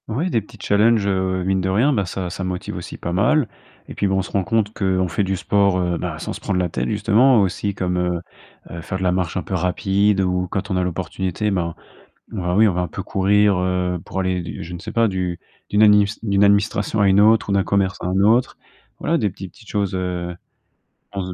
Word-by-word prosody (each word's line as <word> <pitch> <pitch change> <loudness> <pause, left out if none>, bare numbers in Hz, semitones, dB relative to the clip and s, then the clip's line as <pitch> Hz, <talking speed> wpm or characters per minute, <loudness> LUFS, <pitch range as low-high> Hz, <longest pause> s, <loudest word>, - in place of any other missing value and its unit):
Oui, 145 +11 -2
des 115 - +1
petits 110 +3 -16
challenges, 105 +2 +3
heu, 95 -1 0
mine 95 0 0
de 95 - -1
rien, 120 +10 +3
bah, 100 -6 0
ça 90 0 -4
ça 95 - -5
me 90 - -2
motive 90 -1 -5
aussi - - -7
pas 85 - -4
mal 125 +9 +2 0.4
et - - -8
puis, 100 - 0
bah, 95 - 0
on 95 - +2
se - - -8
rend 100 - 0
compte 110 0 0
qu'on 95 -3 0
fait 95 +4 -1
du 95 0 -1
sport, 100 +1 +2
heu, 90 -1 0
ben, - - -4
sans - - -5
se - - -8
prendre 95 -2 -1
la 90 -1 0
tête - - -2
justement, 110 +4 +4
aussi 100 +1 -1
comme, 90 -1 -1
heu 90 -1 0 0.5
heu, 85 - -6
faire 95 - -4
de 95 - -4
la 90 - +2
marche 90 -2 -1
un 90 - -2
peu - - -7
rapide 95 +2 +1
ou 90 -1 0
quand 100 +3 -4
on 95 - +1
a 90 - +1
l'opportunité, 95 +3 -2
ben 85 -4 -2 0.5
ben, 90 -4 -2
oui, 110 +2 +6
on 100 - +2
va 90 - -1
un 90 - -2
peu - - -6
courir, 100 0 +2
heu, 90 -1 -1
pour 95 - -4
aller, 90 -2 -3
je 85 - -8
ne - - -6
sais 110 +5 -8
pas, 115 0 +3
d'u 90 -4 -2 0.3
d'une 105 +1 +2
adinis 105 -1 +5
d'une 100 -2 +2
administration 100 +1 +2
à 100 - +4
une 95 +1 +5
autre 110 0 +4
ou - - +1
d'un 100 -1 +2
commerce 95 -2 0
à - - -4
un 95 +1 0
autre, 115 +5 +3 0.4
voilà, 165 +1 0
des 105 - +1
petites 95 -1 -10
petites 110 - -18
choses, 100 -3 -1
heu 90 -1 -3 0.8
on 100 - -1
ze 90 0 -5
95 Hz, 250 wpm, -21 LUFS, 90-105 Hz, 0.8 s, oui